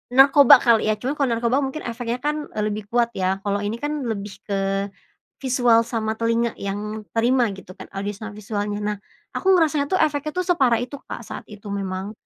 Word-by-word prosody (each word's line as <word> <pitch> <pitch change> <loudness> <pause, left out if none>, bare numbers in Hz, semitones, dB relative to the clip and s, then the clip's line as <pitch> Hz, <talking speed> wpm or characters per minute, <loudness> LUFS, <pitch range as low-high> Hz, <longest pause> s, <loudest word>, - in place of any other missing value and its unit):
narkoba 275 0 +8
kali 230 -2 +4
ya? 215 - +3
Cuma 245 +6 -2
kalau 275 -3 +1
narkoba 235 +3 +1
mungkin 275 +3 -4
efeknya 235 0 -3
kan, 300 0 -1
e - - -2
lebih 210 -1 -3
kuat 235 0 +2
ya, 190 +1 -1
kalau 200 0 0
ini 205 +2 -2
kan 295 0 -3
lebih 205 -2 -4
ke 195 0 0 0.5
visual 245 -3 +3
sama 220 -2 -2
telinga 230 0 +1
yang 210 +2 -4
diterima 235 +4 +1
gitu 190 -1 -11
kan, - - -8
audio 195 +1 -4
sama 220 +1 -7
visualnya. 205 0 -3
Nah, 210 0 -2 0.4
aku 385 - +3
ngerasanya 310 -4 +3
tuh 370 - +1
efeknya 305 -1 +1
tuh 365 0 0
separah 260 -9 +3
itu, 255 +4 -5
Kak, - - -7
saat - - -7
itu 210 0 -11
memang. 195 0 -3
230 Hz, 195 wpm, -23 LUFS, 205-265 Hz, 0.5 s, narkoba